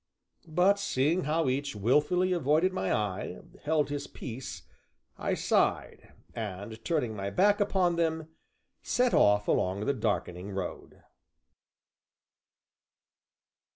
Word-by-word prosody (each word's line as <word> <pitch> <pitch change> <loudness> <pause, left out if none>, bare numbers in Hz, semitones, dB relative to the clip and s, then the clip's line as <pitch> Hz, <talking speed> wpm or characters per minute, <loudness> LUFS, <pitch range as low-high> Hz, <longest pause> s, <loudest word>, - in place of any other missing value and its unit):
But, 180 +5 +3
seeing 155 -1 +1
how 155 +1 +1
each, 140 0 -1
wilfully 150 - +2
avoiding 165 +3 +2
my 95 - -1
eye, 100 -3 -2 0.2
held 150 -1 +1
his 145 -1 -3
peace, 125 +1 -7 0.5
I - - -1
sighed, - - 0 0.2
and 110 +1 -6
turning 140 -10 -1
my 100 -1 -3
back 205 - +3
upon 185 -4 +2
them, 160 -1 0 0.5
set 250 0 +1
off 105 0 +4
along 95 +3 0
the 140 - +2
darkening 100 -5 -2
road. 95 -2 -6
145 Hz, 110 wpm, -29 LUFS, 105-170 Hz, 0.5 s, off